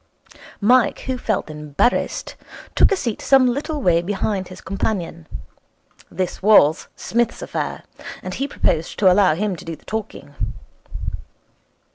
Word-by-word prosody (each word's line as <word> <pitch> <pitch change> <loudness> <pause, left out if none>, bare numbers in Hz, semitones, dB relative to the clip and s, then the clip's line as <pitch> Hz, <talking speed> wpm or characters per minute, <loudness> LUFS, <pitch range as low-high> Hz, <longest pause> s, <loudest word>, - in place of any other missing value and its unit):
Mike, 245 +4 +4
who 260 - -2
felt 220 -5 -1
embarrassed, 150 - -1 0.4
took - - +5
a - - +4
seat 235 - -3
some 270 -2 +5
little 285 +3 -1
way 170 -2 +4
behind 195 +1 -2
his 185 0 -11
companion. 175 -5 -3 0.8
This 185 0 -3
was 185 -7 +5
Psmith's 235 0 -1
affair, - - -4 0.4
and - - -5
he 275 - -2
proposed 165 - 0
to 190 -3 +5
allow 185 -4 +4
him 200 +1 -1
to - - -11
do 165 -1 -5
the - - -24
talking. 210 -9 -6
200 Hz, 135 wpm, -21 LUFS, 170-240 Hz, 0.8 s, took